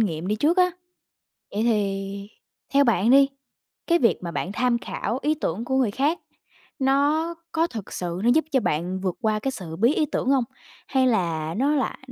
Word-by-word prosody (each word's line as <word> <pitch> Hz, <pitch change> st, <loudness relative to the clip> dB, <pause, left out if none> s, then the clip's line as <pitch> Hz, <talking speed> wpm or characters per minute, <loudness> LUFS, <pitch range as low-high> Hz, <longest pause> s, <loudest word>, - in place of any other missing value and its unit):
nghiệm 170 Hz, -6 st, -1 dB
đi 210 Hz, +2 st, 0 dB
trước 310 Hz, -, +2 dB
á. 360 Hz, -1 st, +4 dB, 0.8 s
Vậy 210 Hz, +2 st, -1 dB
thì 200 Hz, -3 st, -1 dB, 0.4 s
theo 280 Hz, 0 st, +6 dB
bạn 225 Hz, -3 st, +2 dB
đi, 275 Hz, +1 st, +7 dB, 0.6 s
cái 340 Hz, 0 st, +3 dB
việc 230 Hz, -, +3 dB
mà 170 Hz, -, -4 dB
bạn 170 Hz, +4 st, -3 dB
tham 245 Hz, +3 st, +1 dB
khảo 240 Hz, +1 st, -4 dB
ý 305 Hz, +2 st, +1 dB
tưởng 225 Hz, -, -3 dB
của 265 Hz, +1 st, 0 dB
người 250 Hz, -6 st, +2 dB
khác 290 Hz, +9 st, 0 dB, 0.6 s
nó 290 Hz, +5 st, +2 dB, 0.2 s
có 330 Hz, +1 st, +1 dB
thật 220 Hz, -, -8 dB
sự 175 Hz, +1 st, -4 dB
nó 240 Hz, -, +4 dB
giúp 315 Hz, -1 st, +2 dB
cho 265 Hz, -, +3 dB
bạn 180 Hz, +1 st, -1 dB
vượt 185 Hz, -2 st, -1 dB
qua 215 Hz, -1 st, +1 dB
cái 270 Hz, +5 st, -2 dB
sự 175 Hz, -10 st, -7 dB
bí 235 Hz, -, +3 dB
ý 310 Hz, -, +2 dB
tưởng 265 Hz, -, -2 dB
hông? 270 Hz, -2 st, +3 dB, 0.4 s
Hay 260 Hz, -1 st, +2 dB
là 165 Hz, -8 st, 0 dB
nó 280 Hz, +4 st, +2 dB
lại 270 Hz, -, -1 dB
235 Hz, 200 wpm, -24 LUFS, 195-275 Hz, 0.8 s, đi